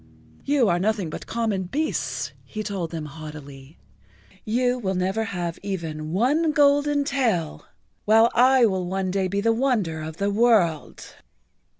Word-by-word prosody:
"You 275 -4 +2
are 175 -2 +2
nothing 200 -4 -1
but - - -8
common 220 -5 -1
beasts," 300 - -2
he 215 -1 -6
told 190 -5 -4
them 160 -2 -5
haughtily. 145 -1 -10 0.7
"You 245 +3 0
will 190 -4 -2
never 190 +5 -1
have 175 -4 -4
even 160 -6 -5
one 290 - +2
golden 290 -1 +3
tail, 220 - -1 0.4
while 225 +2 +5
I 255 +1 +5
will 190 -4 -1
one 190 0 -2
day 190 0 0
be 200 +2 -1
the 225 +2 +2
wonder 225 -11 0
of 155 +1 -7
the 200 0 0
world." 200 -8 +1
200 Hz, 145 wpm, -24 LUFS, 170-240 Hz, 0.7 s, while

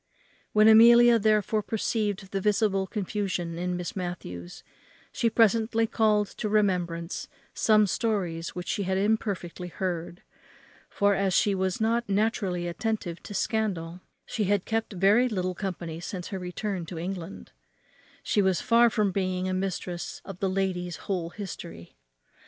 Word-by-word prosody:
When 215 0 +5
Amelia 235 +1 +8
therefore 215 0 +2
perceived 205 -3 -2
the 195 - -2
visible 200 -1 +1
confusion 190 -5 -3
in 180 0 -2
Miss 180 -1 -5
Matthews 130 - -6 0.5
she 230 - +1
presently 225 +1 +3
called 215 -2 +2
to 210 - -1
remembrance 180 -5 0 0.3
some 215 -1 +4
stories 185 -6 -2
which 180 0 -6
she - - -1
had 190 -1 0
imperfectly 195 -4 -1
heard; 175 -1 -4 0.7
for, 200 0 +2
as 195 -2 +1
she 205 - +3
was 190 -1 -1
not 230 +1 0
naturally 195 -4 0
attentive 180 -1 -3
to 205 - -8
scandal, 185 -7 -2 0.4
and 210 - +2
had 200 -1 +1
kept 225 -1 -2
very 205 +7 +4
little 185 -4 -2
company 175 -4 -5
since 180 0 -6
her 190 - -4
return 180 +1 -4
to 175 - -7
England, 180 +1 -6 0.7
she 205 - +2
was 190 -2 +2
far 235 +1 +4
from 210 -3 +1
being 185 -1 -1
a 185 - -1
mistress 185 -2 -3
of 195 -2 -8
the 195 - 0
lady's 185 -2 -1
whole 180 -4 -2
history. 85 - -8
195 Hz, 145 wpm, -27 LUFS, 180-215 Hz, 0.7 s, Amelia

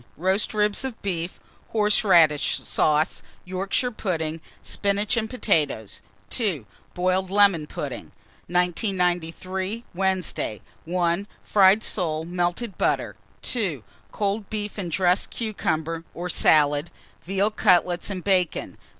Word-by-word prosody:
Roast 190 +5 +1
ribs 210 +1 +2
of 260 -4 -5
beef, 175 -3 -3 0.3
horseradish 190 -8 +4
sauce, 155 +1 +1 0.2
Yorkshire 195 +7 -1
pudding, 165 -7 -3 0.2
spinach 205 +3 0
and 220 -1 -1
potatoes. 150 - 0 0.3
2. 185 - 0 0.3
Boiled 185 +1 +1
lemon 195 -6 +4
pudding. - - -5 0.4
1993. 180 +2 0
Wednesday. 185 - -1 0.3
1. 175 +3 0 0.2
Fried 200 +1 +5
soles, 160 -4 0
melted 175 +5 -2
butter. - - 0 0.3
2. 185 - -1 0.3
Cold 205 0 -2
beef 210 -1 -4
and 180 -3 -3
dressed 180 +2 +2
cucumber 165 -7 -2
or 180 +1 -4
salad, 150 -1 +3 0.3
veal 195 +4 0
cutlets 180 -4 +2
and 185 -3 -4
bacon. 185 -4 0
185 Hz, 105 wpm, -24 LUFS, 170-205 Hz, 0.4 s, Fried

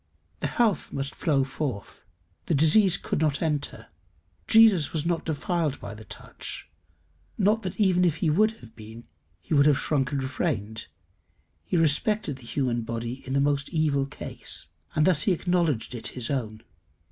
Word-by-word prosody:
The - - -1
health 225 -5 0
must 135 0 -4
flow 145 -5 +1
forth; 135 -5 -5 0.4
the 165 - +2
disease 170 +6 +5
could - - -3
not 150 -2 +1
enter: 150 -4 -2 0.6
Jesus 220 -9 +5
was 155 -1 -2
not 170 -1 -1
defiled 160 -1 -1
by - - -7
the 110 0 -11
touch. - - -8 0.7
Not 210 +2 +2
that 185 -1 -5
even 185 -3 +3
if 170 -4 +2
he 160 - -1
would 215 +8 +3
have 115 -2 -15
been, 110 +1 -11 0.4
he 85 - -5
would 140 0 +5
have 145 -3 +4
shrunk 140 -3 0
and 140 -2 -1
refrained; 110 -4 -3 0.8
he 180 - -1
respected 160 0 +1
the 120 -3 -13
human 125 -4 -1
body 115 +3 -5
in 140 +1 +1
most 140 -1 0
evil 150 -4 +1
case, 140 - -5 0.3
and 155 - +3
thus 175 -5 +4
he 195 - +4
acknowledged 170 - 0
it 120 - -4
his 125 0 -2
own. 110 -5 -3
145 Hz, 165 wpm, -26 LUFS, 130-170 Hz, 0.8 s, disease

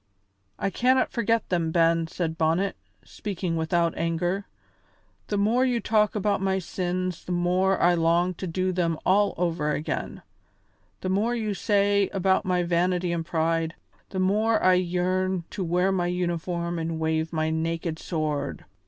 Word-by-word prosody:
"I 195 - -1
cannot 255 +5 +2
forget 230 -2 0
them, 170 -3 0
Ben," 165 0 +3
said 165 -1 -3
Bonnet, 165 +5 +1 0.3
speaking 185 -5 -4
without 165 +1 +1
anger. 175 +4 -1 0.8
"The 205 - -1
more 220 +5 +3
you 250 -2 +1
talk 215 -2 +2
about 205 -1 0
my 190 0 +1
sins 185 -1 -3
the - - -6
more 180 +2 +2
I 175 +1 +4
long 170 +2 +2
to 185 +2 -6
do 185 +2 -1
them 170 -3 0
all 205 +2 +3
over 165 -3 0
again; 150 - -4 0.8
the 185 - -2
more 215 +6 +1
you 215 -3 -1
say 200 0 +2
about 190 +1 +2
my 180 -1 +1
vanity 175 +1 +1
and 165 -1 -2
pride, 165 0 0 0.3
the 190 - -4
more 215 +4 +2
I 185 - +6
yearn 180 0 0
to 195 - -3
wear 180 +3 +1
my 180 -2 0
uniform 175 -1 -2
and 165 0 -3
wave 160 0 0
my 160 -1 0
naked 165 0 -2
sword. 155 -4 -3
180 Hz, 155 wpm, -26 LUFS, 165-195 Hz, 0.8 s, I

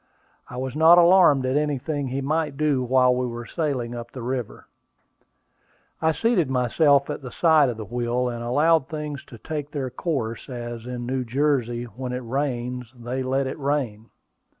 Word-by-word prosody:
I 125 - -8
was 130 +1 -4
not 160 +3 +7
alarmed 170 -6 +6
at 130 +1 0
anything 145 -1 -1
he 130 +2 -3
might 150 0 -1
do 150 -3 +1
while 125 0 +4
we 125 0 -1
were 120 0 -6
sailing 130 -4 -2
up 120 0 -7
the 125 -1 -8
river. 125 -2 -4 1.4
I 160 0 +3
seated 185 - +1
myself 140 +3 +3
at - - -5
the 130 - -7
side 155 0 +4
of 120 - -4
the 110 - -6
wheel, 120 +3 -1
and 120 -1 -4
allowed 150 +5 +3
things 150 -2 -5
to 120 - -12
take 150 +4 -5
their 135 -4 -4
course, 125 -5 -3
as, 120 -2 -6
in 125 -1 -5
New 130 +1 -1
Jersey, 125 -2 0
when 125 +2 -6
it 125 0 -4
rains, 125 -2 -3
they 125 +3 -3
let 135 +1 0
it 130 - -5
rain. 130 -6 -2
130 Hz, 175 wpm, -24 LUFS, 120-150 Hz, 1.4 s, not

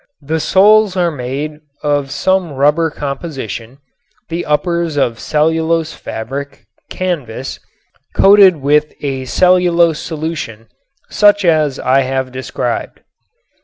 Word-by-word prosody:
The 160 +3 -1
soles 205 +3 +4
are 175 -2 +1
made 145 +3 -5 0.2
of 145 -2 0
some 180 +3 0
rubber 150 +4 +2
composition; 135 - -6 0.5
the 170 +1 -4
uppers 170 +1 0
of 120 -5 0
cellulose 160 +1 0
fabric 135 +6 -7 0.2
(canvas) 140 -9 -4 0.6
coated 195 -2 +6
with 150 +2 +2
a 135 -2 -3
cellulose 175 +1 +3
solution 150 -10 -5 0.4
such 205 -1 +4
as 155 -5 +2
I 130 +1 +2
have 130 0 -2
described. 130 +1 -4
150 Hz, 105 wpm, -15 LUFS, 135-170 Hz, 0.6 s, coated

